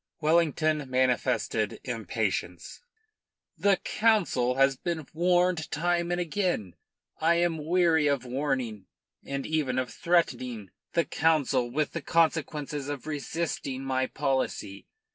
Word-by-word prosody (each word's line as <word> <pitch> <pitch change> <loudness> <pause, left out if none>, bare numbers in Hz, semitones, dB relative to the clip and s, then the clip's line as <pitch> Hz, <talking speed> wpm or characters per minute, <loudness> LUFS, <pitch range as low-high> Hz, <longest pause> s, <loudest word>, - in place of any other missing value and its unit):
Wellington 155 -2 +2
manifested 130 -1 0
impatience. - - -3 0.7
"The 200 -1 +3
Council 185 - +1
has 135 0 +4
been 160 +1 -3
warned 175 0 +2
time 175 +2 0
and 175 - 0
again. 175 - -1 0.5
I 165 +2 +3
am 170 -2 0
weary 165 -2 +3
of 140 -3 0
warning, 125 -6 -2 0.4
and 140 0 -4
even 150 -5 0
of 130 -1 -2
threatening, 125 - 0 0.2
the 170 - +2
Council 145 -6 +1
with 150 +4 -1
the 165 - -4
consequences 150 -3 0
of 145 -2 -5
resisting 150 -3 -3
my 130 -1 0
policy. 135 -8 -2
150 Hz, 115 wpm, -28 LUFS, 130-170 Hz, 0.7 s, has